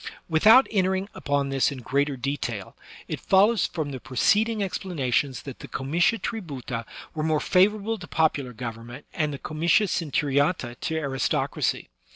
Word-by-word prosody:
Without 215 +11 +6
entering 190 -1 0
upon 140 -1 -1
this 135 +1 +2
in 140 - -6
greater 140 +2 0
detail, 120 -6 -4 0.3
it - - -4
follows 205 +3 +3
from 155 -4 -4
the 130 - -6
preceding 210 - +1
explanations 140 -9 -1
that 135 -3 -9
the - - -9
comitia 170 - +1
tributa 135 - -5 0.3
were 155 - -3
more 155 -1 +1
favorable 205 +5 +2
to 180 - -9
popular 145 -5 0
government, 120 +2 -8
and 155 -3 0
the 140 - -5
comitia 170 +9 +1
centuriata 145 -4 0
to 160 - -2
aristocracy. 135 - -1
150 Hz, 145 wpm, -25 LUFS, 135-190 Hz, 0.3 s, Without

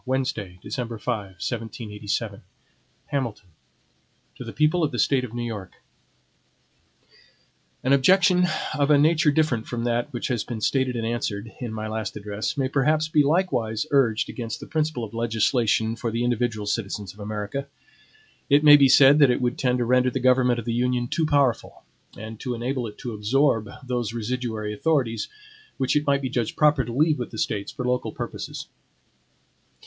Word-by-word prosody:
Wednesday, 125 -8 -2
December 120 -4 -4
5, - - -19 0.3
1787 110 -1 -4 0.7
HAMILTON 115 -9 -3 0.9
To - - -8
the - - -7
People 155 +3 +2
of 150 - +1
the - - -4
State 135 -2 +2
of 120 -2 -7
New 120 - -3
York: 105 -5 -6 2.1
AN 130 - +3
OBJECTION, 180 +5 +4 0.3
of 145 -1 +1
a 150 - +6
nature 155 +2 +4
different 145 -7 +1
from 120 -1 -3
that 120 +3 -1
which 120 0 -4
has 120 -4 0
been 115 -2 -6
stated 130 +3 0
and 115 -1 -2
answered, 115 -2 -3
in 120 -3 -4
my 110 0 -4
last 110 0 -4
address, 105 +7 -4
may 135 -2 +1
perhaps 150 +4 +1
be 155 -1 +4
likewise 140 - 0
urged 115 -6 +2
against 115 -2 -5
the - - -8
principle 155 -6 -1
of 110 0 -7
legislation 115 0 +1
for 115 0 -3
the 115 +2 -2
individual 120 -3 -1
citizens 100 -2 -3
of 105 - -20
America. 105 +6 -4 0.8
It 145 +1 +5
may 145 -1 +9
be 140 -2 +5
said 140 +2 +7
that 140 -3 +6
it 125 - +2
would 125 0 0
tend 125 -1 +1
to 120 - 0
render 125 +1 +3
the 130 - -3
government 125 -1 +3
of 120 - -5
the 115 - -1
Union 120 0 0
too 160 -2 0
powerful, 140 -6 0 0.3
and 110 +1 -8
to 125 -2 -3
enable 120 +1 -2
it 105 - -11
to 120 -3 -6
absorb 115 +1 +1 0.2
those 120 -3 -2
residuary 115 -2 -3
authorities, 125 -3 0 0.5
which 130 +1 0
it 150 0 +1
might 140 -1 +2
be 130 - -1
judged 120 -4 -2
proper 150 -3 +4
to 120 - -6
leave 150 +3 +2
with 120 - -4
the 110 - -9
States 100 -1 -2
for 125 - -5
local 125 0 -1
purposes. - - -6
125 Hz, 175 wpm, -24 LUFS, 110-140 Hz, 2.1 s, may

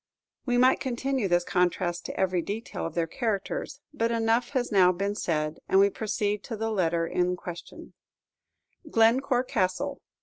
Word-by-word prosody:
We 245 -1 +2
might 255 +1 +5
continue 260 -2 -1
this 175 -1 +2
contrast 175 -1 0
to - - -6
every 185 -2 +1
detail 205 0 -4
of 165 - -10
their 170 -1 +1
characters; 205 +2 -3
but 230 -5 0
enough 230 +1 +1
has 255 -4 -1
now 185 -3 +6
been 200 +3 -2
said, 155 -6 -2
and 190 - +5
we 200 +1 +5
proceed 210 -1 -2
to 225 - -5
the 225 +1 -2
letter 170 -4 +1
in 180 +1 0
question: 175 -1 -9 1.0
Glencore 245 +2 +3
Castle. 255 +4 -1
205 Hz, 160 wpm, -27 LUFS, 180-235 Hz, 1.0 s, now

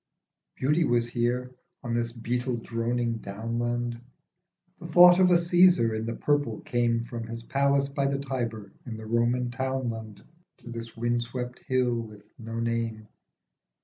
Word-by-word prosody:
Beauty 150 +6 +2
was 120 -4 +2
here, 125 +1 -1 0.3
on 120 -2 -3
this 120 0 0
beetle 120 +1 -2
droning 115 0 -2
downland; 120 +3 -3 0.8
The 170 - -8
thought 175 +2 +8
of 185 -1 +6
a 180 - +6
Cassar 170 -8 +4
in 110 +1 -3
the 115 - -3
purple 145 -7 0
came 120 -1 0
From 115 -1 -6
his 115 0 -7
palace 140 +2 +2
by 140 0 -1
the 140 0 0
Tiber 120 -7 -4 0.2
in 110 -2 -5
the 110 - -9
Roman 120 +2 +1
townland 120 -5 -4 0.3
To 120 - -11
this 115 -1 -7
wind 120 +1 0
swept 125 +1 -5
hill 125 -2 0
with 105 -2 -11 0.2
no 115 0 -5
name. 115 -2 -2
120 Hz, 150 wpm, -27 LUFS, 115-130 Hz, 0.8 s, thought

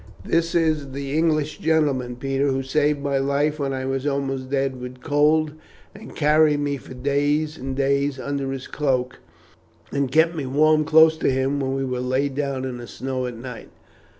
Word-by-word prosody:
This 165 +1 +1
is 155 -5 +1
the 140 +1 -4
English 155 -2 +1
gentleman, 145 -6 +1
Peter, 135 +2 -1
who 135 -1 0
saved 145 +1 +1
my 140 -1 0
life 145 +3 0
when 140 -1 -1
I 130 -1 -3
was 135 +1 -2
almost 135 -2 -2
dead 135 -2 -1
with 125 0 -8
cold, 150 +2 +2 0.4
and 215 +1 -12
carried 150 0 +4
me 145 -1 -1
for 130 0 -11
days 145 +3 0
and 135 -3 -5
days 140 0 +1
under 140 0 -3
his 135 -1 -5
cloak, 130 -4 -1 0.7
and 140 -2 -1
kept 160 +3 +4
me 145 -4 -3
warm 155 +3 +3
close 160 0 +6
to - - +1
him 135 +2 0
when 135 -1 -1
we 135 - -1
lay 130 +2 -1
down 135 -1 -3
in 130 -2 -4
the 120 - -8
snow 130 +1 -4
at 120 -2 -7
night." 125 0 -9
140 Hz, 180 wpm, -23 LUFS, 130-150 Hz, 0.7 s, close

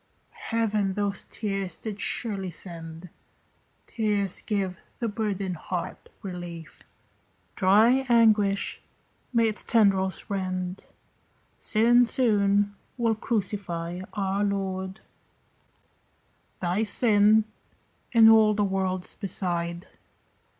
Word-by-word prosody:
Heaven 215 -4 0
those 200 -2 -2
tears 195 -5 -4
did 215 -1 -6
surely 200 -5 -2
send. 165 -1 -7 0.7
Tears 205 -4 -1
give 195 -4 -2 0.2
the 235 - -2
burdened 200 -4 -3
heart 175 +2 -6
relief; 175 -3 -8 0.7
Dry 220 +7 +4
anguish 215 -4 +3 0.5
may 230 -2 +3
its 215 - -1
tendrils 195 -4 +2
rend. 185 -2 -4 0.7
Sin 240 +2 +4
soon 205 -4 +2 0.2
will 230 -2 +2
crucify 185 -6 -3
our 195 -1 -1
Lord, 190 0 -3 1.6
Thy 180 +3 0
sin, 215 -1 +4 0.7
and 225 -2 +7
all 220 -1 +6
the 205 - +1
world's 190 -2 -2
beside. 175 -3 -2
200 Hz, 90 wpm, -26 LUFS, 185-220 Hz, 1.6 s, and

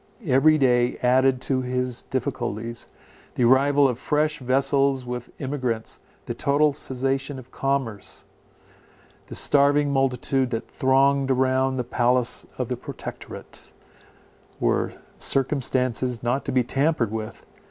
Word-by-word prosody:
Every 155 +2 +4
day 125 -3 +2
added 130 +1 +3
to 130 -1 0
his 125 -1 -2
difficulties; 120 -4 -4 0.5
the - - +1
arrival 140 +3 +5
of 125 -2 -3
fresh 150 +2 0
vessels 135 +1 +1
with 125 0 -5
emigrants, 130 -5 -3 0.3
the - - -3
total 145 +1 +2
cessation 135 0 -2
of 130 -1 -12
commerce, 135 -7 -3 1.0
the - - -8
starving 145 0 +3
multitude 135 -1 +1
that 115 -2 -4
thronged 135 +1 +2
around 130 0 +1
the 125 - -1
palace 125 0 0
of - - -2
the - - -3
Protectorate, - - -9 0.9
were - - 0 0.3
circumstances 130 -3 0
not 125 +3 -1
to - - -2
be 130 -1 +2
tampered 135 -2 0
with. 110 -1 -6
130 Hz, 120 wpm, -24 LUFS, 125-140 Hz, 1.0 s, arrival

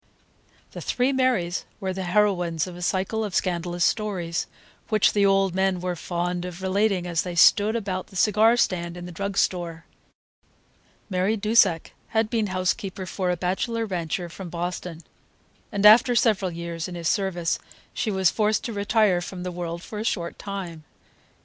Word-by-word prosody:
The - - -8
three 255 +2 0
Marys 250 -10 +1 0.2
were 190 -1 -2
the 190 0 -4
heroines 175 -4 +1
of 180 -2 -8
a 175 - -9
cycle 190 +5 -1
of 205 -4 -4
scandalous 175 -1 0
stories, 185 -6 -1 0.4
which 215 -3 +3
the 200 -1 +4
old 195 -2 +3
men 190 -1 +1
were 180 0 -2
fond 175 +1 -3
of 180 +1 -7
relating 195 -1 +1
as 170 -2 0
they 180 -1 -5
sat 205 +5 +5
about 195 -5 -3
the 195 - -16
cigar 215 +4 +4
stand 175 -5 0
in 175 - -7
the 180 - -8
drug 200 +3 -4
store. 170 -3 -1 1.2
Mary 190 +3 0
Dusak 205 -5 +3 0.2
had 220 -1 0
been 225 -3 +1
housekeeper 185 +1 -2
for 185 +1 -2
a 180 - 0
bachelor 210 +6 -1
rancher 175 -2 -3
from 175 +2 -9
Boston, 175 0 -5 0.7
and 205 -1 0
after 240 +4 +7
several 210 -5 +2
years 170 0 -5
in 180 - -7
his 170 -2 -3
service 185 -5 0 0.3
she 220 - -2
was 190 -3 +2
forced 215 0 +1
to 235 - -4
retire 205 -3 +2
from 180 0 -7
the 180 - -4
world 170 -1 -5
for 210 - -7
a - - -2
short 170 -6 -2
time. 185 -6 -6
185 Hz, 170 wpm, -25 LUFS, 175-210 Hz, 1.2 s, after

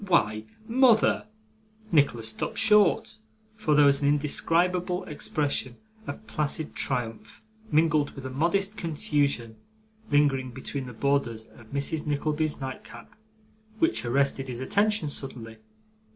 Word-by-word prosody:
Why, 110 - +1 0.2
mother 235 -3 +3 0.3
' - - -36 0.3
Nicholas 120 -8 +2
stopped 110 - -4
short; 210 -1 +4 0.4
for 160 -9 +1
there 145 0 +6
was 140 0 +4
an 140 - +2
indescribable 175 +5 +1
expression 145 -4 -2 0.3
of 220 - -7
placid 155 -2 -2
triumph, 115 -4 -4 0.3
mingled 155 -2 +2
with 135 -2 -9
a 130 - -5
modest 195 +9 0
confusion, 145 -8 -1 0.5
lingering 135 -4 +2
between 130 +1 -5
the 125 - -8
borders 120 -4 -1
of 110 -2 -18
Mrs. 140 +3 -1
Nickleby's 150 +1 -1
nightcap, 130 -3 -8 0.6
which 330 +8 +1
arrested 135 +2 0
his 120 -2 -5
attention 205 +5 +1
suddenly. 120 -6 -6
145 Hz, 125 wpm, -27 LUFS, 130-165 Hz, 0.6 s, there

